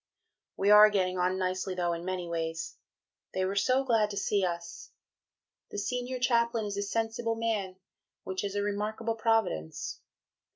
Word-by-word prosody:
We 200 +1 +3
are 210 0 +10
getting 185 -3 0
on 180 +1 +1
nicely 185 0 -2
though 175 -1 0
in 170 0 -5
many 185 -1 -3
ways. 165 -1 -3 0.6
They 185 0 +1
were 195 +1 -2
so 255 +6 +3
glad 225 -5 +2
to 200 - -6
see 200 0 +1
us. 170 -1 -4 0.8
The - - -7
Senior 250 +4 -2
Chaplain 235 -2 +2
is 205 -1 -3
a 200 - -1
sensible 225 +2 -1
man, 215 -5 -1 0.5
which 190 +1 -3
is 200 0 -3
a 205 - 0
remarkable 210 +2 -2
Providence.... 220 - -1
205 Hz, 160 wpm, -30 LUFS, 185-225 Hz, 0.8 s, are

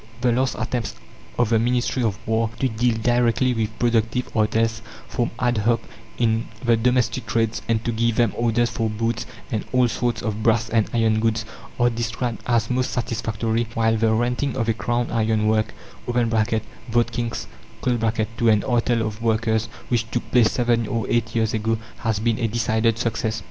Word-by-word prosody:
The 125 -1 +3
last 130 +2 +1
attempts 120 - -2 0.4
of 120 -3 +2
the 115 -1 +3
Ministry 125 +2 +1
of 110 -4 0
War 110 0 +1
to 135 - +2
deal 115 0 +1
directly 120 +1 +2
with 110 -1 -2
productive 120 +1 0
artels, 110 +1 +1 0.3
formed 120 - -1
ad 120 -2 +1
hoc 115 +2 +2 0.4
in 115 -1 +1 0.2
the 120 -1 +5
domestic 120 0 +1
trades, 115 +1 0
and 115 -1 0
to 120 - +1
give 115 0 +1
them 120 -2 +2
orders 120 0 +1
for 115 -2 -1
boots 115 +2 -2 0.2
and 110 - -1
all 125 -1 +4
sorts 120 0 -1
of 110 0 -2
brass 115 0 +2
and 110 -2 +2
iron 110 -2 +2
goods, 115 0 0 0.3
are 120 0 +4
described 115 +1 -3
as 115 -1 +1
most 125 0 +1
satisfactory; 115 -1 -1
while 115 -1 +2
the 110 0 +2
renting 125 +4 0
of 115 -2 0
a 115 - +3
Crown 120 +2 -1
iron 110 -1 +1
work, 110 -1 +2 0.4
(Votkinsk) 115 0 -1 0.4
to 115 -1 +1
an 105 -2 +4
artel 120 -2 +1
of 110 +1 -5
workers, 110 -1 +1 0.2
which 115 -2 0
took 120 - -3
place 120 -4 +5
seven 120 -2 +1
or 115 -3 -1
eight 115 -1 0
years 110 -1 +1
ago, 110 +1 0 0.2
has 110 -3 -1
been 115 +2 0
a 115 - +1
decided 115 0 +1
success. 115 -1 -1
115 Hz, 175 wpm, -23 LUFS, 110-120 Hz, 0.4 s, the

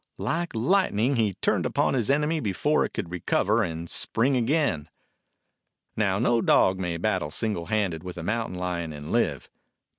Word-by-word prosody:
Like 170 -4 -2
light 185 - +2
ning 120 +7 +2
he 105 -5 +1
turned - - 0
upon - - +1
his 120 -4 0
enemy 150 +3 +2
before 125 +7 +1
it - - -2
could 85 - -5
recover 100 +5 +1
and 85 -4 -3
spring 130 +10 +1
again. 125 - 0 1.1
Now, 100 -3 +1
no 120 +1 +2
dog 95 -3 +3
may 90 -3 -2
battle 75 -2 -1
single 95 0 -1
handed 100 -7 -1
with 90 -1 -7
a 85 - -5
mountain 110 -1 -2
lion 85 -3 -3
and 75 0 -8
live. - - 0
105 Hz, 170 wpm, -26 LUFS, 85-125 Hz, 1.1 s, dog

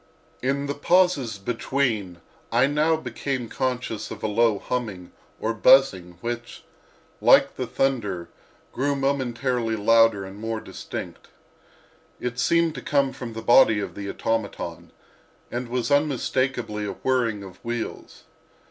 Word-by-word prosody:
In 140 +2 0
the 140 - -2
pauses 145 - +2
between 110 -4 -2 0.3
I 120 +3 +4
now 150 +3 +2
became 130 -3 -4
conscious 125 -4 -3
of - - -8
a - - +1
low 110 0 +3
humming 100 -6 -4 0.3
or 115 - -1
buzzing 95 -7 +4
which, 120 0 -5 0.6
like - - +5
the - - -3
thunder, 105 -10 -1 0.5
grew 140 +2 0
momentarily 125 -4 0
louder 115 -1 +4
and 95 +1 -10
more 110 0 -3
distinct. - - -8 0.9
It 125 0 -4
seemed 165 +5 +3
to - - -7
come 140 -2 +1
from 125 -3 -7
the 115 0 -6
body 115 -3 +6
of 100 - -4
the 100 -1 -6
automaton, 115 -1 -3 0.6
and 120 0 -4
was 125 +1 -1
unmistakably 130 -6 0
a 100 - -3
whirring 115 -6 0
of 95 -2 -13
wheels. 120 -1 -5
120 Hz, 130 wpm, -24 LUFS, 110-135 Hz, 0.9 s, body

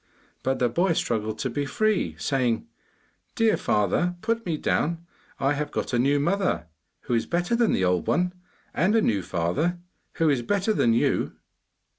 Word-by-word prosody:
But 130 0 0
the 125 - +2
boy 170 +9 +1
struggled 110 -7 -1
to 130 - -2
be 145 +4 -1
free, 195 - 0
saying 125 - 0 0.7
'Dear 225 -2 +3
father, 105 - +1
put 230 -1 -1
me 160 -3 0
down. 165 +3 -1 0.3
I 135 +1 +2
have 150 +1 -2
got - - -3
a 120 - +2
new 140 +3 +3
mother, 180 - 0 0.4
who - - -3
is 115 - +1
better 175 +6 0
than 235 -1 +3
the 95 - +2
old 90 -1 +1
one; 180 0 +1 0.4
and 190 +7 +2
a 225 - +4
new 100 -4 +1
father, 95 - -1 0.4
who 165 - +1
is 140 -5 +2
better 200 - 0
than 115 - +3
you. 115 - +1
145 Hz, 175 wpm, -25 LUFS, 115-180 Hz, 0.7 s, a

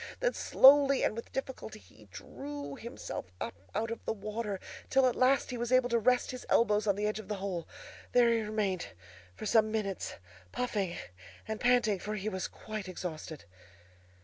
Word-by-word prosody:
Then - - +1
slowly 275 0 +6
and - - +1
with 230 - -7
difficulty 265 - -5
he 95 0 -18
drew 140 +8 -7
himself 235 - -7
up - - -3 0.2
out 225 +1 -1
of 230 - -5
the - - 0
water, 210 -1 -4 0.3
till 265 -1 +4
at 250 - +2
last 260 +1 +3
he 250 - -3
was 240 +1 -2
able 255 -1 +4
to 235 -1 +3
rest 250 +2 +2
his 255 - -7
elbows 210 -2 +3
on 200 - +3
the 205 +1 -1
edge 215 +1 -1
of 215 - -9
the 210 - -2
hole. 190 -4 -4 0.4
There 240 -1 +5
he 230 - +1
remained 210 - -2 0.4
for - - -7
some 215 -1 +4
minutes, 205 -4 -2 0.4
puffing 200 -8 -2 0.5
and 220 0 -3
panting, 240 -5 +3
for 210 +4 -4
he 210 +1 -2
was 190 -3 -3
quite 215 -3 -7
exhausted. 160 -4 -6
215 Hz, 180 wpm, -31 LUFS, 190-240 Hz, 0.5 s, slowly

